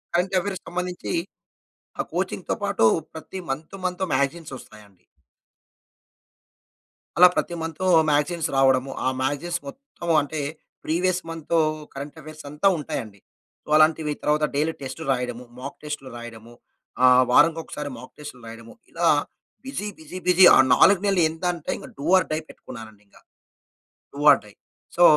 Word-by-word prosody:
Current 180 +2 +1
అఫైర్స్‌కి 190 0 -5
సంబంధించి 180 0 -4 0.9
ఆ - - 0
కోచింగ్‌తో - - -2
పాటు - - +1 0.3
ప్రతి 160 +4 -8
మంత్ 155 +8 -5
మంత్ 180 +1 -2
మాగజైన్స్ 140 +3 -1
వస్తాయండి. 105 -5 -16 2.2
అలా 180 - +9
ప్రతి 175 - -1
మంతు 165 +3 -4 0.2
మాగజైన్స్ 150 +3 +1
రావడము 135 0 +3
ఆ! - - +2
మ్యాగజైన్స్ 150 +6 -1
మొత్తం 175 - -9
అంటే 150 +2 -5 0.5
ప్రీవియస్ 180 +3 0
మంతూ 165 0 -2 0.4
కరెంట్ 140 +3 -8
అఫైర్స్ 155 0 -11
అంతా 150 +7 +1
ఉంటాయండి. 110 -8 -6 0.4
సో, - - -29
అలాంటివి 155 -1 +3
తరువాత 150 +1 +2
డైలీ 155 +3 +1
టెస్ట్‌లు 150 +4 -6
రాయడం 125 -2 -2 0.2
మాక్‌టెస్ట్‌లు 140 +1 -7
రాయడము 120 -1 -10 0.5
ఆహ్, 125 0 +7
వారంకి 165 +5 +5
ఒకసారి 150 -2 -6
మాక్‌టెస్ట్‌లు 130 +2 -11
రాయడము 115 0 -11 0.2
ఇలా - - 0 0.6
బిసీ, 265 -6 -4
బిసీ, 160 +3 -9
బిసీ 180 +1 +7
ఆ! - - +6 0.2
4 195 +9 +6
నెలలు 195 -3 +2
ఎంత 160 +2 -10
అంటే 170 -3 -5
ఇంగ - - -10
డు 140 - -5
ఆర్ 185 - +1
డై 155 - 0
పెట్టుకున్నానండి 110 -3 -12
ఇంగ. - - -28 1.0
Do 140 - -8
or - - +5
die. 105 - -15 0.4
సో, 175 - +5
150 Hz, 140 wpm, -24 LUFS, 130-175 Hz, 2.2 s, అలా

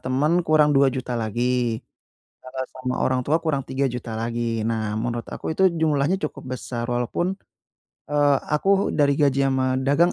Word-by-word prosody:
temen, 135 +5 +1
kurang 155 -1 +4
Rp2.000.000 135 -2 +2
lagi. 120 +1 -1 0.6
Kalau 130 0 -5
sama 130 -1 -3
orang 130 0 +1
tua 160 +3 +2
kurang 150 -5 -1
3.000.000 125 -3 -2
lagi. 115 0 -2
Nah, 110 -2 -1
menurut 120 0 -3
aku 160 - -4
itu 190 -1 +5
jumlahnya 155 +4 +1
cukup - - -13
besar 120 -2 -5
walaupun, 120 +7 -1 0.8
eee, 145 -1 +4 0.2
aku 195 +5 +2
dari 140 -2 +2
gaji 140 -2 +2
sama 130 -1 +1
dagang, 145 +6 +3
130 Hz, 150 wpm, -23 LUFS, 120-145 Hz, 0.8 s, itu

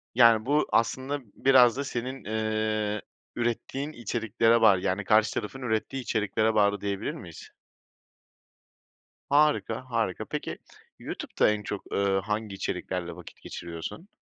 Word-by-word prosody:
Yani, 115 -2 +6
bu 145 +3 +2
aslında 130 +5 +1 0.2
biraz 130 -3 +5
da 140 - -1
senin, 130 0 -4
eee, 110 -1 -1 0.3
ürettiğin 120 +5 -2
içeriklere 115 -2 +1
bağlı, 100 -5 +6
yani, 95 +3 -1
karşı 110 +1 +3
tarafın 135 +6 -4
ürettiği 125 +3 -1
içeriklere 110 0 0
bağlı 105 -1 +3
diyebilir 100 -1 -2
miyiz? - - -10 1.8
Harika, 145 -5 +2
harika. 115 -6 -1
Peki, - - -4 0.4
YouTube'da - - 0
en 105 0 -1
çok, 105 -1 -6
eee, 100 -1 +2
hangi 105 -1 -3
içeriklerle 90 -2 -3
vakit 90 0 -13
geçiriyorsun? 85 - -7
110 Hz, 120 wpm, -27 LUFS, 105-125 Hz, 1.8 s, Yani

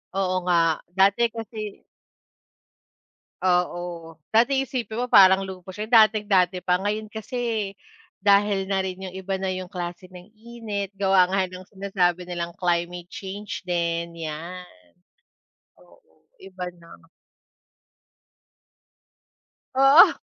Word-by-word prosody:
Oo 185 -1 0
nga 165 -3 +2 0.2
dati 200 +5 +4
kasi 220 -2 -7 1.6
Oo, 175 -2 -1 0.2
dati 265 +4 +4
isipin 245 -4 -3
mo 250 - -1
parang 195 -3 +6
luho 185 -1 -9
siya, 210 +3 -6
dating 215 -2 +5
dati 185 -2 +2
pa. 180 0 +1
Ngayon 210 +3 -2
kasi, 220 -2 -3 0.5
dahil 200 -1 +3
na 190 -1 0
rin 185 0 -5
yung 185 - -10
iba 190 0 -3
na 190 - -2
yung 185 -1 -4
klase 180 0 -6
ng 180 +1 -12
init 215 -3 -6
gawa 195 -1 +3
nga 190 -1 +1
ng 185 0 -10
sinasabi 185 -3 -1
nilang 170 -1 -4
climate 175 0 -1
change 205 -2 -7
din 170 -1 -2 0.2
yan. 175 +4 -7 1.1
Oo, 90 - -25 0.2
iba 190 -1 -8
na. 170 - -17 2.9
Oo. 270 +5 +7
190 Hz, 115 wpm, -24 LUFS, 180-210 Hz, 2.9 s, Oo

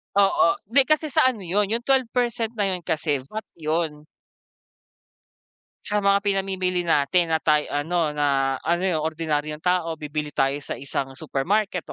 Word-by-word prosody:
Oo, 195 -4 +4 0.2
di 275 +1 +5
kasi 310 -1 +1
sa 255 - +4
ano 225 -7 -2
yun, 195 +4 +1
yung 230 +3 -1
12% 245 -3 0
na 200 -2 0
yun 180 -1 -3 0.5
VAT 220 +5 -6
yun. 155 -1 -2 1.8
Sa 210 0 +1
mga 200 0 +3
pinamimili 190 -2 0
natin 165 +1 +2
na 160 - +3
tayo 150 -1 +1
ano 160 +2 0
na 140 -2 +1
ano 170 +2 +1
yung 160 -5 0
ordinaryong 155 -1 -2
tao 180 -2 +1
bibili 150 -1 -5
tayo 135 +1 +1
sa 145 - -6
isang 135 -1 -4
supermarket 180 +7 -1
170 Hz, 145 wpm, -24 LUFS, 150-200 Hz, 1.8 s, di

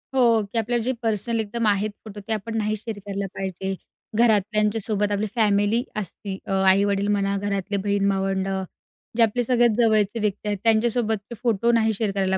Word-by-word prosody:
हो, 235 -4 +4
की 205 +3 -6
आपल्या 240 +2 0
जे 260 - +1
पर्सनल 225 +1 0
एकदम 220 +1 -1
आहेत 205 +1 +2 0.2
फोटो 210 -1 -8
ते 225 - 0
आपण 225 +1 -4
नाही 215 0 0
शेअर 220 0 -6
करायला 200 0 -4
पाहिजे. 190 0 -3 0.4
घरातल्यांच्यासोबत, 210 -1 +2
आपली 205 +1 0
फॅमिली 210 +1 +2 0.2
असती 195 0 -6
अ, - - -6 0.2
आई-वडील 200 +1 +2
म्हणा, 200 -1 +1
घरातले 200 0 -2
बहीण-भावंडं, 195 -1 0 0.5
जे 230 - +6
आपले 230 +2 +1
सगळ्यात 240 -2 +3
जवळचे 220 -2 +2
व्यक्ती 210 -1 -2
आहेत, 205 -1 0
त्यांच्यासोबतचे 225 -1 +1
फोटो 235 -1 +2
नाही 220 -1 +2
शेअर 210 0 -1
करायला 190 -1 +1
210 Hz, 165 wpm, -23 LUFS, 200-225 Hz, 0.5 s, जे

